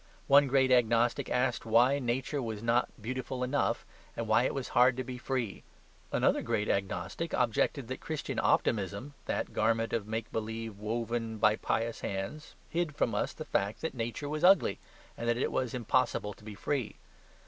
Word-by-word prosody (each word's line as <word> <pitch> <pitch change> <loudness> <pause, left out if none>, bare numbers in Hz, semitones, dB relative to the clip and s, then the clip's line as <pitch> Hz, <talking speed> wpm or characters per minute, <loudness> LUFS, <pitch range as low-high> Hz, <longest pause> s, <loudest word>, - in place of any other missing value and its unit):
One 140 0 +6
great 130 0 +3
agnostic 120 -1 +3
asked 125 -1 +1
why 120 +5 +4
Nature 130 +3 -1
was 110 -3 -4
not 115 +1 +2
beautiful 125 +3 -4
enough, 135 +3 0 0.3
and 115 - -2
why 110 +3 +4
it - - 0
was 135 -2 -3
hard 125 +1 +4
to 130 - -1
be 125 0 -7
free. 120 -5 -3 0.5
Another - - +2
great 105 - -1
agnostic 95 - -2
objected 125 +2 +1
that 130 - -5
Christian 155 -2 -3
optimism, 105 +6 0
"the - - 0
garment 115 +1 +1
of 110 -3 -1
make 110 0 -3
believe 110 -1 -4
woven 115 +1 -2
by 105 0 +4
pious 115 +1 -1
hands," 100 +11 -5
hid 165 -3 -2
from 115 - +1
us 105 - 0
the - - -8
fact 100 +2 -1
that 160 - -2
Nature 120 +4 -4
was 150 +1 -3
ugly, 190 +2 +5 0.4
and 120 0 -2
that 120 - +2
it 125 - 0
was 125 -3 -1
impossible 120 -3 0
to 100 - -20
be 105 -1 -8
free. 130 +3 -2
120 Hz, 175 wpm, -31 LUFS, 110-130 Hz, 0.5 s, One